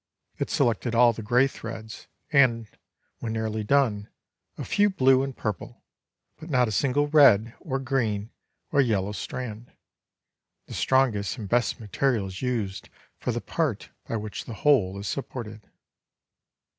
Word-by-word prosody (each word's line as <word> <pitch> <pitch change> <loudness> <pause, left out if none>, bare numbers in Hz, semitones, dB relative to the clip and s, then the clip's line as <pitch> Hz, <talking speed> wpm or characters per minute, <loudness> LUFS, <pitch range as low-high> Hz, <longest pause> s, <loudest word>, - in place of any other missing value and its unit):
It - - -2
selected 115 0 0
all 120 0 +6
the 115 - -7
gray 120 +5 +3
threads, 115 -4 -8 0.2
and, 125 -5 +4 0.5
when 115 -1 -4
nearly 110 -1 -2
done, 110 -4 +1 0.5
a - - -5
few 205 0 +3
blue 130 -8 +4
and 135 -1 -4
purple, 105 -5 -5 0.6
but 160 +1 -10
not 125 -4 +3
a - - -3
single 140 +7 +1
red, 125 -7 +5
or 135 -7 -3
green 120 -6 -1 0.4
or 145 - +4
yellow 105 -6 0
strand. 115 +1 -6 0.9
The - - -10
strongest 130 -6 +1
and 105 -4 -6
best 120 +4 +1
material 115 +1 0
is 95 -1 -7
used 115 -7 -3 0.3
for - - -2
the - - -3
part - - -2 0.2
by - - -3
which 105 -1 -5
the 115 - -7
whole 105 -9 +2
is 100 +1 -5
supported. 110 -6 -6
115 Hz, 145 wpm, -26 LUFS, 105-135 Hz, 0.9 s, all